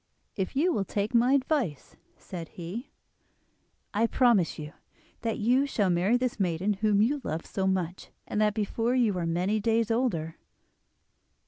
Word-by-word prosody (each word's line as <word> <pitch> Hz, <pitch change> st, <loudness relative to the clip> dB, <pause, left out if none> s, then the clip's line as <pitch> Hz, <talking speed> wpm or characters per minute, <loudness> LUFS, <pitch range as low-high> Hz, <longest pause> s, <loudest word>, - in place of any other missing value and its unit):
"If 190 Hz, +6 st, -3 dB
you 335 Hz, +6 st, +2 dB
will 200 Hz, -, 0 dB
take 205 Hz, +3 st, -2 dB
my 245 Hz, +3 st, +4 dB
advice," 260 Hz, -, 0 dB, 0.2 s
said 170 Hz, -3 st, -7 dB
he, 185 Hz, +9 st, -7 dB, 1.0 s
"I 225 Hz, +2 st, +2 dB
promise 230 Hz, -9 st, +3 dB
you 150 Hz, +1 st, -7 dB, 0.5 s
that 225 Hz, -1 st, -1 dB
you 250 Hz, +6 st, +2 dB
shall 205 Hz, -8 st, +1 dB
marry 185 Hz, +7 st, +3 dB
this 250 Hz, -3 st, -2 dB
maiden 185 Hz, +2 st, +1 dB
whom 205 Hz, 0 st, +2 dB
you 280 Hz, +5 st, 0 dB
love 160 Hz, +2 st, -3 dB
so 190 Hz, -1 st, -2 dB
much, 185 Hz, -2 st, -2 dB, 0.2 s
and 210 Hz, -, -1 dB
that 210 Hz, -1 st, +2 dB
before 225 Hz, +3 st, 0 dB
you 230 Hz, -6 st, +2 dB
are 170 Hz, -, -1 dB
many 180 Hz, +6 st, 0 dB
days 225 Hz, +1 st, +1 dB
older." 185 Hz, -10 st, -1 dB
210 Hz, 155 wpm, -28 LUFS, 185-240 Hz, 1.0 s, my